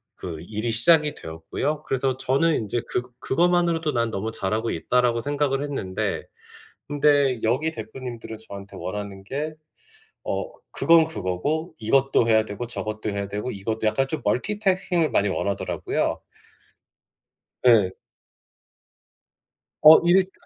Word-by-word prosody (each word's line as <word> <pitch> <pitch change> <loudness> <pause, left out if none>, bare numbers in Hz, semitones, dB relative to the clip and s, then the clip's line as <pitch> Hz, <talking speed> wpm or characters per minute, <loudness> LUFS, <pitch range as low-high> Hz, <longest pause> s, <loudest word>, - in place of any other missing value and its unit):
그 85 -3 -6
일이 110 +6 -3
시작이 150 +6 +4
되었고요. 80 - -4
그래서 130 -2 -1
저는 140 +5 +2
인제 110 +2 -2
그 125 - -1 0.2
그것만으로도 170 0 +1
'난 115 -2 +1
너무 110 +1 -3
잘하고 110 +2 -2
있다.'라고 120 +6 +1
생각을 145 0 0
했는데 135 -11 -3 0.6
근데 145 -3 +3
여기 130 +8 +1
대표님들은 120 -7 -7
저한테 100 0 -9
원하는 100 0 -5
게 145 +9 -4 0.7
어 - - -2 0.3
그건 165 -1 +5
그거고 155 - -2
이것도 130 +1 +2
해야 110 -1 +4
되고 110 +3 -6
저것도 110 -2 -4
해야 100 0 -3
되고 105 +5 -4
이것도 110 +2 -3
약간 110 +5 +2
좀 155 - -3
멀티태스킹을 185 - +1
많이 100 -2 +2
원하더라고요. 100 +2 -2 1.4
네. 110 -7 +5 1.9
어. 155 +1 +10
일 185 +2 +4
125 Hz, 290 characters per minute, -24 LUFS, 105-150 Hz, 1.9 s, 어